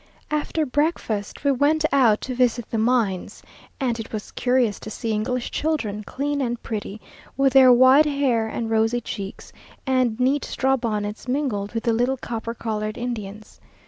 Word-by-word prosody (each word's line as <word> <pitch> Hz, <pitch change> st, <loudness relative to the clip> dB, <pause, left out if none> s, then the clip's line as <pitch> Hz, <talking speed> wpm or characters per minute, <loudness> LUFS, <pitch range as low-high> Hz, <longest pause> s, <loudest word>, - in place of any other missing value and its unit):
After 300 Hz, +1 st, 0 dB
breakfast, 255 Hz, -8 st, -2 dB
we 280 Hz, -, +3 dB
went 295 Hz, +4 st, +2 dB
out 235 Hz, -6 st, +4 dB
to 260 Hz, -, -4 dB
visit 245 Hz, -2 st, 0 dB
the 225 Hz, -, 0 dB
mines, 220 Hz, -5 st, 0 dB, 0.4 s
and 245 Hz, -4 st, -1 dB
it 225 Hz, -, -7 dB
was 215 Hz, -2 st, -6 dB
curious 245 Hz, -5 st, +1 dB
to -, -, -8 dB
see 225 Hz, +1 st, -4 dB
English 235 Hz, +3 st, -2 dB
children, 230 Hz, -10 st, -2 dB
clean 285 Hz, +5 st, -2 dB
and 240 Hz, -2 st, -2 dB
pretty, 215 Hz, -1 st, -5 dB, 0.4 s
with 275 Hz, -1 st, +3 dB
their 260 Hz, -2 st, +8 dB
white 260 Hz, +5 st, +6 dB
hair 265 Hz, -6 st, +1 dB
and 225 Hz, +1 st, -3 dB
rosy 225 Hz, +2 st, +2 dB
cheeks, 200 Hz, -4 st, -7 dB, 0.3 s
and 255 Hz, -3 st, +1 dB
neat 270 Hz, +3 st, +2 dB
straw 265 Hz, 0 st, +1 dB
bonnets, 215 Hz, -2 st, -3 dB
mingled 250 Hz, -7 st, -2 dB
with 225 Hz, -, -1 dB
the 235 Hz, -, +2 dB
little 245 Hz, +4 st, +1 dB
copper 230 Hz, -1 st, -5 dB
coloured 215 Hz, -2 st, -3 dB
Indians. 215 Hz, -4 st, -6 dB
240 Hz, 165 wpm, -23 LUFS, 220-265 Hz, 0.4 s, their